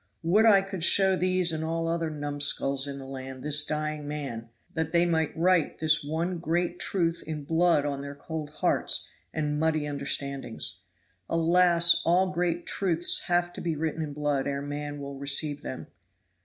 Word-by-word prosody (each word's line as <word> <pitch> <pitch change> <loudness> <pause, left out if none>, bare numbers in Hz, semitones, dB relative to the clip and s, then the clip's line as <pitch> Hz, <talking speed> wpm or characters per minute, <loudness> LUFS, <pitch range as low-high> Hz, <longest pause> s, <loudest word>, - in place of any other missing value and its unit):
Would 205 +7 +4
I 200 -3 +6
could 195 -3 -5
show 190 +2 +5
these 185 -1 +2
and 160 0 -3
all 165 +1 -2
other 165 -1 -1
numskulls 145 -2 0
in 140 -1 -5
the 135 - -9
land 130 -1 -8
this 150 0 +2
dying 150 -1 -3
man, 135 -6 -5 0.2
that 160 0 -3
they 170 0 +4
might 160 -3 +1
write 175 -1 +2
this 155 -1 +2
one 165 +4 -2
great 175 +1 -1
truth 170 -3 -1
in 155 -2 -4
blood 165 -1 +2
on 140 -1 -3
their 140 0 -7
cold 155 +1 -6
hearts 150 - +1 0.2
and 150 -1 -2
muddy 155 -1 +1
understandings. 140 -7 -3 0.4
Alas! 170 +1 +4
all 185 +2 +2
great 175 -1 -1
truths 175 -3 +2
have 175 0 +1
to - - -7
be 165 -2 -2
written 160 +1 -2
in 150 -2 -4
blood 145 -2 -1
ere 140 0 -2
man 145 0 -5
will 140 -1 -7
receive 145 +1 +2
them." - - -6
160 Hz, 170 wpm, -27 LUFS, 145-170 Hz, 0.4 s, I